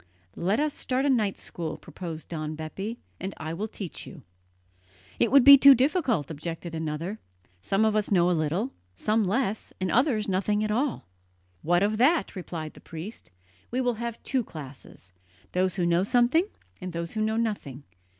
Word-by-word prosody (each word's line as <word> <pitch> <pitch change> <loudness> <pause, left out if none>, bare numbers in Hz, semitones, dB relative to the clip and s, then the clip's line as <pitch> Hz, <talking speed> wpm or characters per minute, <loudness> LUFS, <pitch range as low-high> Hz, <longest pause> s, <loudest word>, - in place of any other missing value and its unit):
"Let 195 +7 0
us 300 -1 +1
start 260 +2 -1
a 285 - +4
night 215 -6 +1
school," 165 -3 -6
proposed 165 -4 -8
Don 155 -2 -4
Bepi, 195 +9 -5 0.2
"and 190 +1 -5
I 160 0 -5
will 205 +6 -3
teach 200 -5 -7
you." 160 -8 -11 1.0
"It - - +3
would 275 -1 +7
be 280 0 +10
too 275 0 +9
difficult," 255 - +1
objected 165 +2 -6
another; 160 +6 -3 0.4
"some 195 - +1
of 215 -1 +2
us 215 -1 +1
know 180 -3 +4
a - - +3
little, 170 - 0 0.2
some 215 - +1
less, 220 0 -1
and 185 -2 -1
others 240 - +2
nothing 205 +2 +1
at 215 - -1
all." 255 +5 -1 0.6
"What 175 +3 +2
of 215 +1 0
that?" 310 +3 +3
replied 165 -4 -6
the - - -15
priest. 165 +8 -9 0.4
"We 250 - -1
will 245 -1 +1
have 235 -1 -5
two 260 -3 0
classes 135 - -11 0.4
those 185 -1 +1
who 180 -3 0
know 170 +1 +3
something, 245 - +3 0.3
and 185 -1 -5
those 170 0 -4
who 215 - -2
know 220 +1 0
nothing. 200 - -3
200 Hz, 180 wpm, -27 LUFS, 165-235 Hz, 1.0 s, be